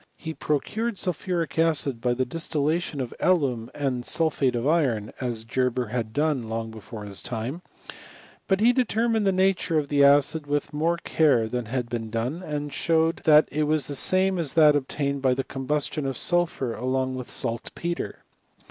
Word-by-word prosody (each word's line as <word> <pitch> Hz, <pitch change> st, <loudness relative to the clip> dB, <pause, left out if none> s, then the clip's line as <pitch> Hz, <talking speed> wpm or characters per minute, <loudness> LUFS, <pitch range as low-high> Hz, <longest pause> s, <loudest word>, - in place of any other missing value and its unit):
He 160 Hz, -1 st, -6 dB
procured 210 Hz, +11 st, -2 dB
sulphuric 175 Hz, -4 st, -2 dB
acid 145 Hz, -7 st, +1 dB
by 120 Hz, 0 st, +1 dB
the 130 Hz, +1 st, 0 dB
distillation 155 Hz, +2 st, -1 dB
of 125 Hz, -, -5 dB
alum 135 Hz, -11 st, +1 dB
and 130 Hz, -4 st, -2 dB
sulphate 140 Hz, -4 st, +1 dB
of 120 Hz, +1 st, -2 dB
iron, 130 Hz, -10 st, +1 dB
as 120 Hz, -3 st, -2 dB
Ge 125 Hz, +3 st, 0 dB
ber 125 Hz, -2 st, -3 dB
had 115 Hz, -2 st, -3 dB
done 145 Hz, -4 st, 0 dB
long 115 Hz, 0 st, -3 dB
before 110 Hz, -1 st, -9 dB
his 100 Hz, -1 st, -2 dB
time; 125 Hz, +8 st, -4 dB, 0.9 s
but 195 Hz, -1 st, +2 dB
he 240 Hz, +2 st, +5 dB
determined 230 Hz, -3 st, +1 dB
the -, -, +4 dB
nature 185 Hz, -3 st, +1 dB
of 145 Hz, -2 st, -1 dB
the 145 Hz, -1 st, +3 dB
acid 145 Hz, +2 st, +4 dB
with 145 Hz, 0 st, -2 dB
more 165 Hz, +3 st, +1 dB
care 145 Hz, -9 st, +2 dB
than 125 Hz, +1 st, -3 dB
had 120 Hz, +2 st, -3 dB
been 115 Hz, -2 st, -4 dB
done, 120 Hz, +9 st, -3 dB
and 150 Hz, -4 st, -4 dB
showed, 165 Hz, 0 st, +1 dB
that 150 Hz, -1 st, +6 dB
it 150 Hz, +1 st, 0 dB
was 155 Hz, -1 st, +2 dB
tlie -, -, -2 dB
same 185 Hz, +5 st, +4 dB
as 155 Hz, -5 st, 0 dB
that 155 Hz, -2 st, +6 dB
ob 140 Hz, -2 st, -1 dB
tained 140 Hz, -1 st, -2 dB
by 130 Hz, -1 st, +2 dB
the 135 Hz, -, -2 dB
combustion 140 Hz, +2 st, -2 dB
of 135 Hz, -, -3 dB
sulphur 170 Hz, -8 st, +1 dB
along 130 Hz, +1 st, -1 dB
with 125 Hz, -1 st, -6 dB
salt 115 Hz, -2 st, -2 dB
petre. 170 Hz, 0 st, -4 dB
145 Hz, 185 wpm, -25 LUFS, 125-165 Hz, 0.9 s, that